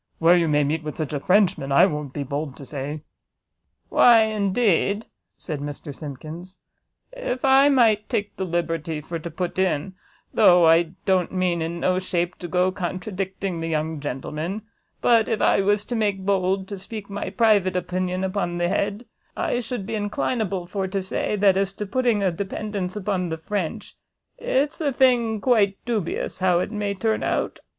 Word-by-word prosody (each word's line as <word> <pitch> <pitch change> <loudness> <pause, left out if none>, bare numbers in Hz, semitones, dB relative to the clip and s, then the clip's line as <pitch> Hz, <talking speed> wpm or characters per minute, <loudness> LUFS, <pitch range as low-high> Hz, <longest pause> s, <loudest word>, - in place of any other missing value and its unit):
where 165 +2 +5
you 170 -2 +2
may 150 -1 +3
meet 155 +3 -1
with 150 -1 -6
such 155 -2 -3
a 145 - -1
Frenchman, 185 -5 +2
I 155 +7 +7
won't 150 -6 -3
be 145 +1 -4
bold 140 0 -4
to 140 - -10
say." 145 +2 -5 0.9
"Why 235 -2 +6
indeed," 205 -1 +1 0.3
said 155 -5 -5
Mr 145 +1 -6
Simkins, 155 +6 -8 0.6
"if - - -3
I 270 +1 +6
might 225 -6 +3
take 205 0 -2
the 190 - -3
liberty 165 -3 -2
for 165 +3 -5
to 170 - -6
put 180 +3 -4
in, 185 -1 0 0.4
though 175 -1 +6
I 165 +1 +4
don't 185 -3 +2
mean 180 -2 0
in 165 +1 -3
no 185 0 +2
shape 175 -1 -2
to 175 - -5
go 180 +2 +2
to - - -16
contradicting 185 0 -4
the 165 - -2
young 160 -1 -2
gentleman, 150 +8 -4 0.4
but 230 -2 +4
if 225 -2 0
I - - +3
was 205 +1 +1
to 240 - -3
make 205 -4 0
bold 190 -1 +1
to 200 -2 -6
speak 205 +1 -8
my 200 0 -4
private 205 -5 +3
opinion 180 +1 -2
upon 185 -2 -2
the 175 0 +1
head, 205 +4 -1 0.3
I 245 - 0
should 245 -4 -4
be 225 - -5
inclinable 205 -2 -1
for 190 +1 -2
to 195 +1 -2
say, 190 +2 -2
that 195 -2 +4
as 195 0 0
to 210 +1 -5
putting 230 0 +1
a 190 - +2
dependance 200 +1 -4
upon 190 -3 -1
the 160 - -3
French, 180 0 -4 0.4
it's 285 +5 0
a 290 -3 +1
thing 240 -4 +3
quite 205 -6 +3
dubious 220 -7 -2
how 185 -2 +3
it 185 - -2
may 205 -2 -2
turn 220 +3 0
out." - - -1
190 Hz, 180 wpm, -23 LUFS, 165-210 Hz, 0.9 s, I